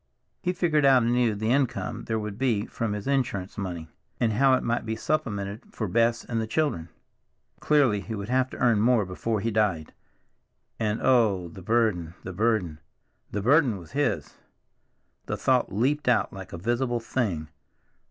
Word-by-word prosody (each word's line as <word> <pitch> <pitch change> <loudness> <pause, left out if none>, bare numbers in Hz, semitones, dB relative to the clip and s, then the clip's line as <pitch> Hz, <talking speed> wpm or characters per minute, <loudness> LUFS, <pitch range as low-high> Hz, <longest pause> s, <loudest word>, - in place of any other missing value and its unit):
He 180 - 0
figured 170 -5 +1
out 135 -3 +6
anew 120 -2 +2
the 110 +3 -1
income 125 -4 -1
there 110 - -1
would 105 -1 -5
be 115 -6 +1
from 115 -3 -3
his 105 -1 -5
insurance 125 -9 -1
money, 90 -5 -5 0.3
and 115 -2 +2
how 135 +4 +4
it - - -2
might 120 +1 0
be 110 0 -3
supplemented 105 -6 -2
for 110 - -3
Bess 115 +4 +1
and 115 -2 -2
the 110 - -3
children. 110 - -1 0.7
Clearly, 135 -9 +3
he 110 +2 -5
would 100 -1 -5
have 130 +1 +1
to - - -9
earn 115 -4 +3
more 115 -2 +3
before 105 +4 -2
he 115 +2 -1
died. 100 -8 0 0.9
And 110 -1 -1
oh, 105 -9 +3
the 95 - -11
burden, 100 -6 0
the 90 - -6
burden, 100 -6 0 0.5
the 105 0 -3
burden 130 -3 +4
was 85 +1 -12
his! 145 0 -1 0.9
The - - -2
thought - - +2
leaped 135 +9 0
out 120 -2 +2
like 95 -2 -9
a - - -6
visible 120 +5 0
thing. 100 -10 -2
110 Hz, 170 wpm, -26 LUFS, 100-125 Hz, 0.9 s, out